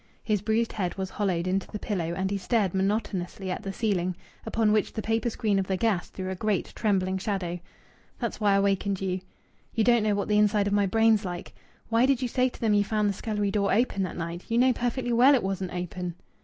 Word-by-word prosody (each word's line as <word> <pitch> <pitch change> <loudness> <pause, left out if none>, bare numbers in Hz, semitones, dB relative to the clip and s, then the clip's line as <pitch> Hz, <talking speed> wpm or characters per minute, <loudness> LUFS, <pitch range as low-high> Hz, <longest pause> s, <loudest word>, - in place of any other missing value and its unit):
His 210 -3 0
bruised 220 +2 0
head 180 -4 -2
was 190 -1 -4
hollowed 185 -5 -1
into 190 +1 0
the 210 - -5
pillow, 175 -6 -2
and 190 +1 -1
he 200 - 0
stared 200 -1 +1
monotonously 190 -1 -1
at - - -3
the 195 -2 -4
ceiling, 185 -4 -1 0.3
upon 220 -1 +2
which 210 -1 +1
the 220 - -3
paper 225 +2 0
screen 210 -3 0
of 190 - -2
the 190 - 0
gas 205 -4 0
threw 185 0 -5
a - - -3
great 205 0 -1
trembling 190 -3 0
shadow. 185 -3 -2 0.6
"That's - - -4
why 205 -1 +4
I - - +4
wakened 200 -1 0
you. 185 -1 -2 0.5
You 225 - +3
don't 240 0 +4
know 210 -1 +1
what 200 - -1
the 210 0 +3
inside 210 -1 +3
of 200 - 0
my 205 -1 +3
brain's 225 +1 +3
like.... 180 0 -6 0.4
Why 230 +2 +4
did 270 -3 +3
you 255 - -1
say 255 +2 +1
to - - -14
them 220 -2 +2
you 205 0 +4
found 210 0 +1
the - - 0
scullery 205 0 -2
door 200 -1 +1
open 220 -2 +1
that 185 - -3
night? 170 +1 -5
You 230 - +1
know 255 +1 +5
perfectly 245 +1 -1
well 255 +5 +6
it 250 - 0
wasn't 190 -1 -2
open." 180 0 -4
200 Hz, 235 wpm, -27 LUFS, 190-220 Hz, 0.6 s, well